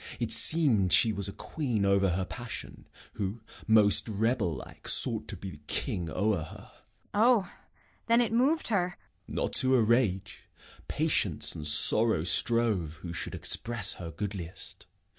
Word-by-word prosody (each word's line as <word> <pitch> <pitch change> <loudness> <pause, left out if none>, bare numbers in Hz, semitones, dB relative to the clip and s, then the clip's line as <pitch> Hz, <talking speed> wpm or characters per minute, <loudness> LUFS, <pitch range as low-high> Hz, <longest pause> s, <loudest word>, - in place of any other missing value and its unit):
It 115 -2 -3
seem'd 115 - +2
she 110 +5 +3
was 100 -1 -4
a - - -6
queen 120 -5 -4
Over 100 0 +1
her 95 +2 -3
passion, 120 +4 -10 0.3
who, 100 +3 -6 0.3
most 110 0 +5
rebel 110 -5 -2
like, - - -13
Sought - - +5
to - - -7
be 95 -7 -10
king 85 -2 -4
o'er 100 +1 -2
her. 75 - -12
Kent. - - -32
O, 230 -6 +2 0.6
then 230 0 +3
it 235 -3 0
mov'd 275 +7 0
her? 180 -4 -2 0.3
Gent. - - -10
Not - - -3
to 130 0 +1
a 120 - +2
rage. 105 -5 -2 0.4
Patience 90 - -1
and 75 -3 -6
sorrow 105 +5 +5
strove 105 -4 +1
Who 85 -2 -8
should - - -6
express 115 -4 +2
her 85 -2 -9
goodliest. 90 0 -7
105 Hz, 155 wpm, -27 LUFS, 90-125 Hz, 0.6 s, most